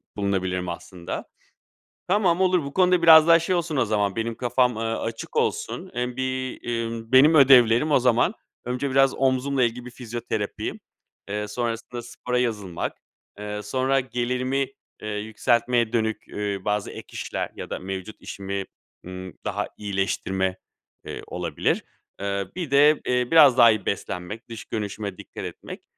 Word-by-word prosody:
bulunabilirim 95 -3 -1
aslında. 85 0 -6 0.8
Tamam, 185 -2 +2
olur. 180 -3 +3
Bu 140 0 -7
konuda 180 -1 +4
biraz 160 -1 +9
daha 165 0 +7
şey 175 +3 0
olsun 165 -4 -1
o 130 - +3
zaman, 105 -2 0
benim 115 0 -2
kafam, 125 -1 +2
eee, 110 - -4
açık 115 0 -4
olsun. - - -1
Hem 125 0 -2
bir, 130 0 -3
emm, 115 -1 -3
benim 140 +5 +7
ödevlerim 130 -1 +6
o 145 - +5
zaman; 125 -1 +3 0.3
önce 125 +3 -2
biraz 135 0 +4
omzumla 135 0 +1
ilgili 120 +1 -1
bir 125 - -8
fizyoterapi, 120 -1 -4 0.5
eee, 105 +1 -2
sonrasında 115 +2 -4
spora 125 +1 -3
yazılmak, 105 -8 -2 0.4
eee, 105 0 -4
sonra 130 +5 +1
gelirimi, 130 +2 -1 0.3
eee, 105 - -5
yükseltmeye 115 +3 +1
dönük, 110 -2 -1
eee, 105 -1 -3
bazı 105 -1 -1
ek - - -9
işler - - -4
ya - - -7
da - - -4
mevcut 95 +2 -6
işimi, 100 0 -5 0.4
ımm, 95 0 -8
daha 105 0 -2
iyileştirme, 95 -2 -1 0.5
eee, - - -6
olabilir. 85 -4 -1 0.4
Eee, 100 -1 -2
bir 175 -6 -4
de, 145 +2 +5
eee, 125 -1 0
biraz 145 -6 +7
daha 120 -2 +8
iyi 110 -3 -2
beslenmek, 100 +4 -4
dış 115 -2 -8
görünüşüme 105 -3 -4
dikkat - - -8
etmek. - - -8
120 Hz, 150 wpm, -24 LUFS, 105-130 Hz, 0.8 s, biraz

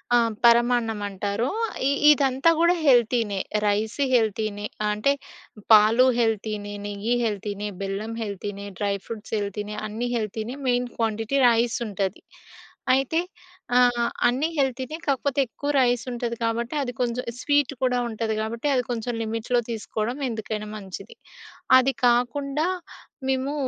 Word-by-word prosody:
ఆ! - - +7 0.3
పరమాన్నం 235 -2 +4
అంటారు. 200 +5 -2 0.4
ఇ - - +3 0.2
ఇదంతా 270 +1 +3
కూడా 340 +1 +5
హెల్తీనే. 235 -5 +3 0.3
రైస్ 210 +4 0
హెల్తీనే, 215 -3 0 0.2
అంటే, 210 +7 +2 0.6
పాలు 220 +4 +7
హెల్తీనే, 215 -2 -1
నెయ్యి 205 +3 -2
హెల్తీనే, 210 -1 -3
బెల్లం 195 +3 -3
హెల్తీనే, 200 0 -5
డ్రై 200 -1 0
ఫ్రూట్స్ 225 -2 -8
హెల్తీనే. 205 +1 -4
అన్నీ 225 +3 -3 0.6
మెయిన్ 245 0 +1
క్వాంటిటీ 225 +3 -1
రైస్ 230 0 +2
ఉంటది. 195 -1 -3 0.7
అయితే 270 +5 +1 0.6
ఆహ్, 245 -1 +4 0.2
అన్నీ 260 +6 +1
హెల్తీనే, 265 +2 -1
కాకపోతే 280 0 0
ఎక్కువ 285 +5 -5
రైస్ 245 -1 +2
ఉంటది 235 -1 -3
కాబట్టి, 235 +3 -1
అది 245 -2 -3
కొంచెం 245 0 -1 0.2
స్వీట్ 285 0 +2
కూడా 250 -1 +2
ఉంటది 220 0 -2
కాబట్టి, 230 +6 -3
అది 250 - +2
కొంచెం 240 0 -2
లిమిట్‌లో 225 +2 0
తీసుకోవడం 225 +2 -3
ఎందుకైనా 220 -1 -4
మంచిది. 195 +1 -9 0.6
అది 260 +1 +3
కాకుండా 275 +6 +1 0.6
మేము 265 +2 0
230 Hz, 120 wpm, -24 LUFS, 210-250 Hz, 0.7 s, ఆ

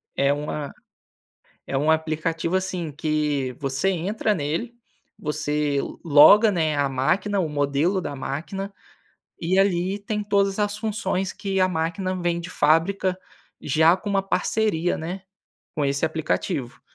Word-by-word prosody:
É 140 0 +3
uma 145 0 -4 0.9
é 135 - -1
um 150 +3 +2
aplicativo, 160 +2 -1
assim, 180 -4 -2
que 150 -3 -1
você 135 +6 0
entra 195 +4 0
nele, 170 - -3 0.4
você 150 -1 -1 0.3
loga, 170 +8 +7
né, 160 -5 0
a 140 -1 +1
máquina, 185 +10 0
o 175 - 0
modelo 145 +6 +1
da 145 -4 -5
máquina, 180 +9 -5 0.7
e 180 +3 +1
ali 190 0 +2
tem 210 +1 -3
todas 200 -1 +1
as 205 0 0
funções 200 -4 -2
que 195 -1 -3
a 185 0 +4
máquina 175 +2 -2
vem 175 -1 0
de 170 +1 -7
fábrica 180 +5 +2 0.4
já 160 +5 +4
com 205 +2 -5
uma 195 -1 +2
parceria, 195 -3 0
né, 175 +4 -5 0.5
com 150 - 0
esse 140 +2 0
aplicativo. 160 -4 -2
170 Hz, 140 wpm, -24 LUFS, 150-195 Hz, 0.9 s, loga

